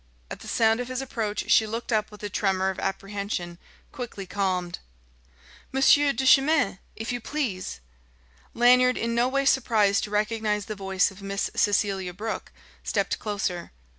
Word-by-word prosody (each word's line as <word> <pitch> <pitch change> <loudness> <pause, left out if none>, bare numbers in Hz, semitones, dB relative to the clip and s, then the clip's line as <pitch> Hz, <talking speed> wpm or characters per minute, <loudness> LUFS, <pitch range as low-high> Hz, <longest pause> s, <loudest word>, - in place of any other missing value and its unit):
At - - -6
the - - -11
sound 225 0 +2
of 245 - -3
his 255 0 -3
approach 225 -6 -3
she 220 - +5
looked 230 +3 -4
up 215 -1 +1
with 210 0 -14
a - - -1
tremor 190 -1 +1
of 190 - -8
apprehension 195 -3 -4 0.3
quickly 235 -6 -6
calmed. 185 -2 -2 0.9
"Monsieur 280 +2 +5
Duchemin! 270 - +3 0.2
If 225 +2 -4
you 245 -1 -3
please 220 - -3 0.4
" - - -32
Lanyard, 250 +1 +6
in 230 0 -1
no 235 +1 +2
way 275 +1 0
surprised 220 -7 +3
to - - -10
recognise 210 -1 0
the 215 - -5
voice 195 -1 0
of 195 +1 -14
Miss 195 0 -2
Cecelia 195 -3 +1
Brooke, 220 +3 -5 0.3
stepped - - -1
closer. 195 -5 -3
210 Hz, 160 wpm, -26 LUFS, 195-240 Hz, 0.9 s, Lanyard